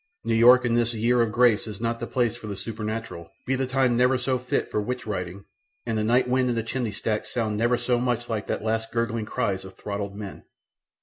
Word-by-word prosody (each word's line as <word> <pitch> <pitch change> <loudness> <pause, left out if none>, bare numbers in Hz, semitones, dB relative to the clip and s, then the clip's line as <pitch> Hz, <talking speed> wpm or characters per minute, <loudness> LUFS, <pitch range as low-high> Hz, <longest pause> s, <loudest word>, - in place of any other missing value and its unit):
New - - 0
York 120 +2 +7
in 120 - +1
this 120 0 +1
year 120 +2 +3
of 115 -2 +1
grace 120 -2 +3
is 105 -3 -6
not 115 0 -1
the 120 - -4
place 120 -2 0
for 115 -3 -9
the 100 - -4
supernatural 110 -5 -5 0.2
be 130 - 0
the 130 0 0
time 130 -1 +2
never 125 +2 +4
so 130 +1 0
fit 125 +1 -2
for 105 - 0
witch 125 +4 -4
riding 95 -2 -4 0.4
and - - -1
the 110 - 0
night 120 +4 +3
wind 125 0 +2
in 120 - 0
the 115 - -1
chimney 115 -1 -2
stacks 110 +1 -2
sound 110 -3 -1
never 120 +3 +2
so 120 0 +1
much 120 -1 -1
like 110 -3 -3
the - - 0
last 110 +1 -2
gurgling 115 -2 -1
cries 100 -7 -1
of 95 0 -11
throttled 100 -1 -4
men. 100 -2 -8
115 Hz, 235 wpm, -25 LUFS, 105-125 Hz, 0.4 s, York